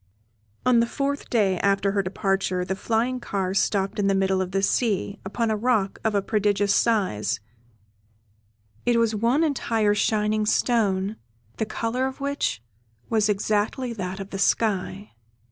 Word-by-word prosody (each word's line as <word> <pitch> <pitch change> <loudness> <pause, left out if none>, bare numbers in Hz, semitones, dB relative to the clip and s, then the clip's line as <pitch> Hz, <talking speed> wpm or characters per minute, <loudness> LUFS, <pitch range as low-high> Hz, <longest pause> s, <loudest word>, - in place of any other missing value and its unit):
On 250 -2 +5
the 230 - +2
fourth 280 +3 -3
day 195 -6 +2
after 195 0 +2
her 200 0 +1
departure 195 -1 -1
the 190 - -2
flying 230 +5 0
car 195 -5 -2
stopped 195 0 0
in 200 - +2
the 195 - +3
middle 190 0 +1
of 185 - -2
the 195 +1 -1
sea, 205 -3 0
upon 220 +4 -1
a - - +1
rock 215 -3 0
of 220 -1 0
a 200 - +1
prodigious 205 -1 +1
size 110 - +1 1.4
it 240 -1 +2
was 230 -1 +2
one 235 +8 +2
entire 225 -8 +1
shining 210 0 +1
stone, 210 -4 +1 0.4
the 220 - -1
colour 235 +4 -1
of 265 - -7
which 280 - -2 0.5
was 215 -2 +2
exactly 210 +5 0
that 190 -3 -5
of 195 0 -7
the 195 - -4
sky. 200 -1 0
210 Hz, 155 wpm, -24 LUFS, 195-230 Hz, 1.4 s, On